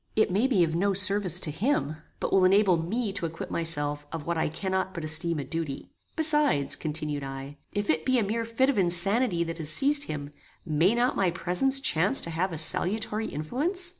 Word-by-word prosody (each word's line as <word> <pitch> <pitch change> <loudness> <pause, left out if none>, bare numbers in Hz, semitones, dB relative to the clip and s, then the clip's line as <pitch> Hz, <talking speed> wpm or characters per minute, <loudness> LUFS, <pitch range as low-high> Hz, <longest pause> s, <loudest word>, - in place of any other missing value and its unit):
It 215 -3 +2
may 210 +8 +2
be 210 -10 +3
of 160 -1 -1
no 195 +4 0
service 195 -2 +1
to 155 - -1
him, 165 - -1 0.2
but - - -3
will 190 - +4
enable 190 0 +4
me 195 +6 -2
to 180 -4 -3
acquit 165 +1 -8
myself 145 -3 -2
of 160 -3 -6
what 170 - -2
I 160 - 0
cannot 190 +3 -3
but 170 - -5
esteem 160 +2 +1
a 145 - -3
duty. 150 0 -5 0.2
Besides," 295 - +3
continued 150 -2 -4
I, 135 +1 -8
"if 205 0 -3
it 155 0 +1
be 260 0 +2
a 230 - +2
mere 225 +3 -2
fit 230 +4 +1
of 245 - -2
insanity 185 +2 +1
that 165 0 -6
has 155 -2 0
seized 285 - +2
him, 145 -1 -6 0.3
may 165 +7 +2
not 245 +2 +1
my 190 -2 +1
presence 180 +11 +2
chance 200 - +3
to 170 - -4
have 175 +4 -1
a 165 - -5
salutary 215 +7 +1
influence? 310 - -1
180 Hz, 205 wpm, -27 LUFS, 160-220 Hz, 0.3 s, will